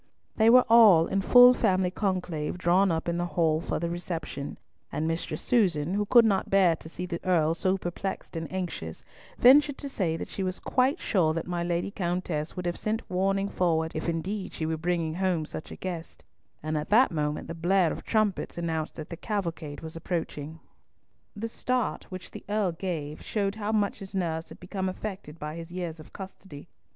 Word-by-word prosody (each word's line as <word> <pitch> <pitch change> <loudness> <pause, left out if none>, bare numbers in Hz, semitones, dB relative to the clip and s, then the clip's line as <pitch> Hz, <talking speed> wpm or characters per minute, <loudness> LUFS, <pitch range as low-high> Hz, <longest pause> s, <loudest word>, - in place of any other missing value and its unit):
They 220 0 +5
were 250 +1 +7
all 215 -8 +7
in 195 +3 0
full 245 +4 +8
family 185 -6 +1
conclave 180 -6 -2
drawn 185 +2 +3
up 160 0 -2
in 170 0 0
the 175 - -1
hall 160 -2 +3
for - - -2
the 170 - -1
reception, 170 -5 -5 0.3
and 155 - -1
Mistress 165 +1 -3
Susan, 180 -9 +2
who 205 +1 0
could 235 +1 +7
not 200 -3 +1
bear 190 -4 +4
to 160 - -11
see 180 +2 -5
the 170 -2 -5
Earl 165 -3 +3
so 185 +3 +1
perplexed 185 +1 -5
and 165 -1 -4
anxious, 175 - -5 0.3
ventured 285 +3 +6
to 285 - -6
say 180 -11 -1
that - - -5
she - - -6
was 185 -1 -2
quite 265 +6 +1
sure 160 -7 +1
that 165 - -2
my 175 -1 -2
Lady 175 +2 -1
Countess 175 -4 -2
would 180 - -5
have 175 0 -2
sent 220 +1 -2
warning 195 +2 +1
forward 160 -4 0
if 155 +2 -2
indeed 185 +5 -3
she 160 - -3
were 160 0 0
bringing 165 -1 -1
home 180 -3 0
such 155 - -7
a - - -8
guest, 175 -3 -6 0.4
and 155 0 -1
at 150 - -6
that 240 +5 +5
moment 150 -2 -2
the - - -5
blare 175 +1 +2
of - - -6
trumpets 215 -6 0
announced 160 -2 -2
that 155 +1 -8
the - - -3
cavalcade 170 -8 -4
was 160 0 -7
approaching. 165 -2 -4 0.8
The 225 +2 -3
start 250 +1 -2
which 185 -1 -8
the - - -9
Earl 205 -3 +1
gave 165 -4 -4
showed 200 -2 -1
how 215 0 -3
much 205 -3 0
his 195 0 -9
nerves 165 -3 -2
had - - -12
become 190 +1 -3
affected 185 -5 -6
by 150 +1 -6
his 165 0 -8
years 175 -3 -4
of 155 - -13
custody. 190 -5 -10
180 Hz, 200 wpm, -28 LUFS, 160-195 Hz, 0.8 s, full